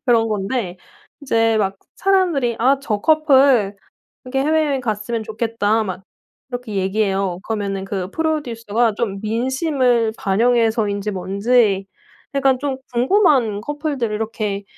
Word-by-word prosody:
그런 230 -2 +3
건데 205 -2 -2 0.4
이제 225 -5 +2
막 195 -1 0 0.2
사람들이 345 -12 +1
"아 265 +4 +3
저 215 -7 -2
커플 270 -8 +4 0.5
이렇게 270 +1 -2
해외여행 300 -2 +1
갔으면 220 0 -2
좋겠다." 220 0 0
막 185 -1 -5 0.5
이렇게 245 -4 -5
얘기해요. 195 -1 0
그러면은 200 -3 -2
그 195 -1 -4
프로듀서가 240 -8 -1
좀 200 -4 -2
민심을 245 0 +1
반영해서인지 215 -1 +1
뭔지 195 +2 +1 0.5
약간 270 -2 +2
좀 275 -1 -2 0.2
궁금한 250 - +3
커플들을 290 -4 -3
이렇게 210 -2 -3
225 Hz, 290 characters per minute, -20 LUFS, 205-265 Hz, 0.5 s, 커플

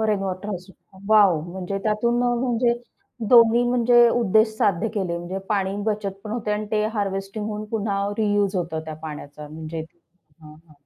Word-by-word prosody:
Rain 210 - +1
water 190 0 -4
harvesting. 185 -1 -9
Wow! 200 -7 +5
म्हणजे 190 +2 -4
त्यातून 235 +3 +1
अ, 245 - +3 0.2
म्हणजे 240 -1 +2 0.6
दोन्ही 235 0 +7
म्हणजे 240 -1 +5
उद्देश 220 -1 +2
साध्य 200 +1 +1
केले 185 -5 -1
म्हणजे 175 +3 -5
पाणी 195 -2 0
बचतपण 210 -1 -3
होते 225 -2 -3
आणि 210 0 -2
ते 215 -1 +1
हार्वेस्टिंग 195 +1 -3
होऊन 210 0 -4
पुन्हा 200 -2 -1 0.2
रियुज 205 -2 +1
होतं 165 -2 -2
त्या 155 - -6
पाण्याचा 150 -1 -8
म्हणजे. 160 +1 -6 0.6
हं, 150 - -12 0.2
हं. - - -18
200 Hz, 160 wpm, -23 LUFS, 185-220 Hz, 0.6 s, दोन्ही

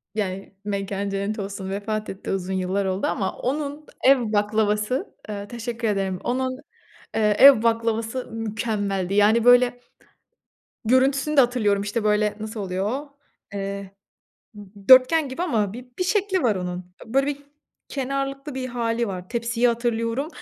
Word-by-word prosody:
yani; 195 -2 -3
mekânı 200 0 -2
cennet 200 +2 -2
olsun, 195 -1 -5
vefat 215 +2 -3
etti. 190 - -6
Uzun 190 0 -2
yıllar 190 +1 -1
oldu, 190 +1 -1
ama 190 - -2
onun 290 +3 -3 0.2
ev 270 0 +6
baklavası, 210 +3 0
eee 205 -1 -5
teşekkür 235 0 -4
ederim; 195 -3 -1
onun 255 +1 -1 0.6
eee, 210 -2 +3
ev 270 -5 +9
baklavası 230 +1 0
mükemmeldi. 205 -4 -2
Yani, 215 +3 +4
böyle 245 0 +5 1.1
görüntüsünü 270 +5 +2
de - - +9
hatırlıyorum. 225 -6 +2
İşte, 210 +2 -2
böyle 210 0 +2
nasıl 215 0 -5
oluyor 190 +1 -2
o? 280 +2 -6 0.4
Eee, 200 -1 -4 0.6
d 205 0 -14
dörtgen 265 +4 +7
gibi 260 +7 -4
ama 215 - 0
bi 245 +2 -10
bir 365 - +1
şekli 380 -1 +1
var 220 -5 +2
onun. 180 0 -5
Böyle 270 +4 +1
bir, 285 -1 -2 0.5
kenarlıklı 275 +1 -3
bir 260 -1 -3
hâli 235 -1 -1
var. 185 -2 -6
Tepsiyi 235 0 +1
hatırlıyorum 235 +3 -1
225 Hz, 145 wpm, -24 LUFS, 200-255 Hz, 1.1 s, ev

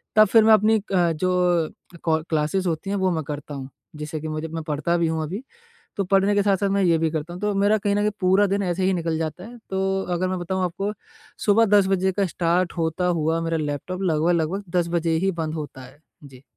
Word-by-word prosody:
तब 215 - +8
फ़िर 225 +1 +5
मैं 220 0 +6
अपनी 215 +1 +4
अ, 185 -4 +1
जो 175 -1 +1 0.3
कॉल 160 -1 +1
क्लासेज़ 160 +4 0
होती 170 +4 -2
हैं 200 - 0
वो 190 -1 +1
मैं 160 -2 -2
करता 145 +1 -7
हूँ 135 -1 -7 0.3
जिससे 155 +1 -4
कि 160 - -5
मुझे 155 +1 -4
मैं 160 0 -5
पढ़ता 155 +3 -1
भी 170 -1 +1
हूँ 160 0 -1
अभी। 195 - -5 0.5
तो 200 - 0
पढ़ने 195 +2 +2
के 205 - +3
साथ-साथ 200 0 +1
मैं 200 0 +1
ये 170 -3 +3
भी 160 0 0
करता 160 +2 -4
हूँ, 180 - -8
तो 210 -1 0
मेरा 205 +2 +3
कहीं 200 0 0
न 205 - +1
कहीं 210 0 +2
पूरा 190 +2 +4
दिन 200 +1 0
ऐसे 180 0 -1
ही 190 - +3
निकल 165 -2 -1
जाता 160 +2 -4
है। 240 +2 -11
तो 190 0 0
अगर 185 +1 -1
मैं 185 - -2
बताऊँ 185 +1 -2
आपको 195 +4 -2 0.5
सुबह 220 +2 +5
10 195 -2 +4
बजे 190 0 +1
का 195 0 0
स्टार्ट 175 +1 0
होता 165 +2 0
हुआ 160 +2 0
मेरा 165 0 -1
लैपटॉप 155 +5 -4
लगभग-लगभग 170 +3 +1
10 170 -1 0
बजे 165 -1 0
ही - - +3
बंद 155 0 -3
होता 145 -4 -7
है। 135 +4 -16 0.2
जी। 135 -1 -14
175 Hz, 235 wpm, -23 LUFS, 160-195 Hz, 0.5 s, तब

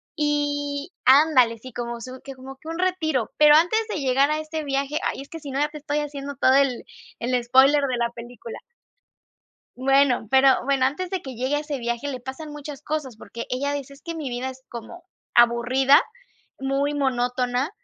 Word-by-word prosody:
Y 290 0 -1
Ándale, 260 -4 +5
sí, 255 +3 -11
como 235 -1 -5
su 255 +2 -8
que 275 - -8
como 265 +1 -11
que 315 - -16
un 330 - -4
retiro, 320 -9 0
pero 300 0 +7
antes 350 +8 +4
de 325 - -2
llegar 270 +2 +3
a 305 - 0
este 310 0 -5
viaje 275 +2 -1
Ay, - - -4
es 275 - -12
que 325 - -8
si 285 -3 -8
no 275 - -2
ya 295 - +1
te 300 - -9
estoy 295 0 -2
haciendo 285 -1 -5
todo 260 -1 +3
el 275 -3 +2 0.4
el 245 +1 0
spoiler 265 +4 +5
de 250 - -1
la 235 0 0
película. 235 -1 -10 1.2
Bueno, 270 -2 +3
pero, 265 0 +6 0.2
bueno, 275 -1 +2
antes 350 +7 -1
de 380 -2 -2
que 265 -2 -8
llegue 260 +5 0
ese 295 -2 -4
viaje, 240 +3 -3
le 255 -3 -5
pasan 265 +5 -8
muchas 295 -1 -8
cosas, 300 -6 -4
porque 235 +1 -8
ella 280 +3 -1
dice: 280 -1 -5
"Es 275 - -20
que 335 -1 -6
mi 310 -4 -4
vida 250 +1 -3
es 260 0 -13
como 240 +10 -9 0.3
aburrida, 245 +4 +5 0.6
muy 275 +2 0
monótona". 250 0 0
275 Hz, 195 wpm, -24 LUFS, 255-295 Hz, 1.2 s, pero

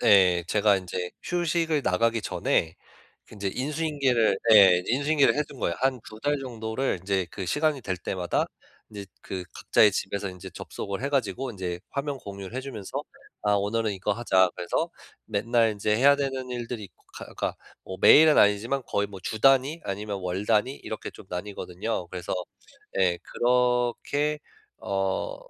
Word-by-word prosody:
네 90 -3 +5
제가 105 +1 +3
인제 90 -1 -4
휴식을 165 -3 0
나가기 115 +3 +1
전에 80 -4 0 0.6
인제 100 -2 -3
인수인계를 140 -6 +1
예 95 -5 +8
인수인계를 140 +3 +3
해둔 145 -2 -3
거예요. 85 - 0
1-2 125 -4 -2
달 145 +3 +1
정도를 115 -2 -3
이제 95 -1 0
그 95 - -5
시간이 145 - 0
될 95 -3 -2
때마다 90 0 -1 0.4
이제 100 -2 -7 0.2
그 95 -1 -6
각자의 105 - +4
집에서 100 +1 -2
인제 90 -1 -9
접속을 100 +3 -6
해 140 - 0
가지고 135 -1 -1
인제 90 -5 -5
화면 140 0 -3
공유를 100 -1 -8
해 - - -1
주면서 125 -7 -6 0.4
"아 105 0 +2
오늘은 105 +2 0
이거 100 +2 -1
하자." 95 -5 +3
그래서 85 - -2 0.4
맨날 115 +2 +2
인제 105 +1 0
해야 140 +4 +6
되는 135 -2 -3
일들이 120 -2 -5
있고 95 - -17
가 - - -8
그러니까 - - -4 0.3
뭐 95 - -7
매일은 155 0 +8
아니지만 110 +7 +3
거의 100 - 0
뭐 100 -1 -9
주 110 - -4
단위 135 +5 +4
아니면 100 0 -4
월 90 +2 -3
단위 115 +4 +2
이렇게 110 -5 -7
좀 - - -14
나뉘거든요. 90 +1 -4
그래서 90 0 -5 0.7
예 90 -2 +2
그렇게 125 +4 +1 0.4
어 95 - -2
110 Hz, 330 characters per minute, -26 LUFS, 95-135 Hz, 0.7 s, 예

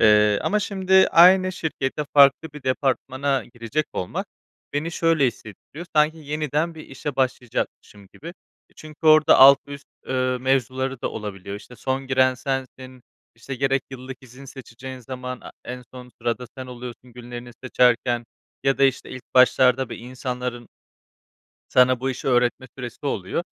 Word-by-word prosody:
Eee, 105 -1 +5
ama 210 - +1
şimdi 190 -2 +3
aynı 185 +2 +6
şirkete 150 -4 -3
farklı 140 +3 +6
bir 150 -1 -11
departmana 135 +1 -1
girecek 120 +6 -2
olmak 90 - -4 0.5
beni 145 +3 -2
şöyle 165 -5 +2
hissettiriyor. 120 - -8
Sanki 150 +1 +4
yeniden 150 +2 -2
bir 155 - -11
işe 135 +1 -6
başlayacakmışım 125 -5 -3
gibi. 165 - -10 0.4
E, - - -30
çünkü 155 +1 -8
orada 155 0 +6
alt 135 +1 +9
üst, 140 0 -10 0.2
eee, 130 -1 0
mevzuları 130 0 -1
da - - -1
olabiliyor. 100 -2 -6
İşte, 125 +4 -13
son 135 +2 -3
giren 130 -1 +3
sensin, 130 -1 -5 0.3
işte, 115 +4 -7
gerek 135 +1 0
yıllık 130 0 -9
izin 130 +2 -14
seçeceğin 130 0 -10
zaman, 125 0 -7
a - - -11
en 125 +1 -7
son 125 -1 -10
sırada 120 +1 -2
sen 130 - -6
oluyorsun 125 0 -10
günlerini 120 0 -9
seçerken 120 -1 +2 0.4
ya 135 0 +2
da, 140 - +5
işte, 130 -1 0
ilk 130 - -8
başlarda 130 0 +4
bir - - -7
insanların 125 -1 -5 1.1
sana 125 -1 +5
bu 135 +1 -2
işi 130 - -5
öğretme 125 0 +1
süresi 125 +2 -8
oluyor. 110 - -2
130 Hz, 150 wpm, -23 LUFS, 125-140 Hz, 1.1 s, alt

